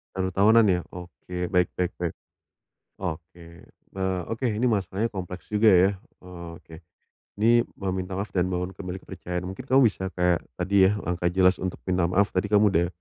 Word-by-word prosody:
1 95 -1 -1
tahunan, 110 +4 +5
ya. 90 -1 +2
Oke, 90 +1 -6
baik 90 -2 +3
baik 90 0 -1
baik. 85 -2 -2 0.9
Oke. 85 -1 -7 0.3
Eee, 95 -1 -1
oke, 115 +3 -3
ini 110 +3 -1
masalahnya 100 +1 -1
kompleks 90 -2 -7
juga, 105 +1 +4
ya. 90 +2 +5 0.3
Eee, 90 -2 -10
oke. 80 - -14 0.6
Ini 120 +2 +5 0.2
mau 95 -2 -2
minta 95 0 -4
maaf 100 +2 -3
dan 90 0 +2
bangun 90 +1 -3
kembali 90 0 -6
kepercayaan. 90 -1 -6
Mungkin 95 +7 -7
kamu 135 0 +4
bisa 95 -2 -4
kayak 90 -2 +1 0.2
tadi 95 +1 +4
ya, 105 - -2
langkah 90 0 -1
jelas 95 0 +4
untuk 95 -1 -4
minta 90 -1 +1
maaf, 95 +3 +2
tadi 100 +2 0
kamu 105 0 +5
udah 85 -1 +2
95 Hz, 180 wpm, -25 LUFS, 90-100 Hz, 0.9 s, tahunan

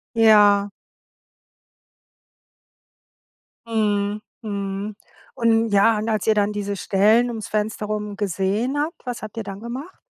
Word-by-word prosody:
Ja. 205 -3 +5 3.0
Mhm, 210 -2 0 0.2
mhm. 200 -1 -4 0.4
Und 230 -1 +2
ja, 205 +2 +4
und 220 +2 -2
als 215 -1 -1
ihr 220 - +4
dann 205 0 +2
diese 205 -1 -3
Stellen 215 +5 +3
ums 225 -3 -5
Fenster 215 0 -2
rum 210 -1 -4
gesehen 205 +6 -1
habt, 300 -1 -3
was 245 -1 -5
habt 215 +1 -9
ihr 225 - -2
dann 200 +1 -8
gemacht? 260 +10 -7
210 Hz, 125 wpm, -22 LUFS, 205-225 Hz, 3.0 s, Ja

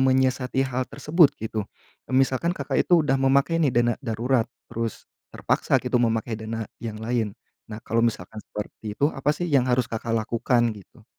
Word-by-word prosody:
menyiasati 130 0 +2
hal 130 0 -2
tersebut 155 -2 +4
gitu 110 0 -3 0.5
e - - -7
misalkan 135 +5 +2
Kakak - - 0
itu 175 -3 +5
udah 135 -2 +2
memakai 140 +5 +3
nih 150 - +4
dana 120 0 +3
darurat, 115 +1 +1 0.2
terus 115 -1 -4 0.3
terpaksa - - +1
gitu - - 0
memakai 115 0 0
dana 110 0 -4 0.2
yang 110 -2 -4
lain. 110 -3 -1 0.4
Nah, 105 +1 -6
kalau 115 +1 +1
misalkan 110 -2 -3
seperti 105 0 -7
itu, 145 +2 +2
apa 135 +1 -3
sih 175 - -2
yang 135 -4 +4
harus 125 0 +3
Kakak 115 0 -2
lakukan, 120 +2 +1
gitu? 100 - -16
120 Hz, 170 wpm, -25 LUFS, 110-135 Hz, 0.5 s, itu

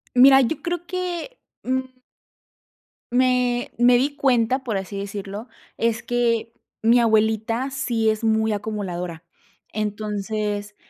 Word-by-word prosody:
Mira, 270 +2 +8
yo 260 +6 -1
creo 345 0 -3
que, 365 +6 -4 0.2
mm. 260 0 -3 1.1
Me 250 -1 +2
me 245 +1 +5
di 285 +3 0
cuenta, 260 -1 +2
por 225 -5 -2
así 195 +1 -5
decirlo, 200 +3 -6 0.3
es 230 -1 0
que 235 -2 0 0.3
mi 235 +2 +5
abuelita 220 +3 +2
sí 230 -4 0
es 215 +1 -1
muy 220 -1 +2
acumuladora. 180 -5 -4 0.5
Entonces, 210 0 -3
230 Hz, 115 wpm, -23 LUFS, 210-255 Hz, 1.1 s, Mira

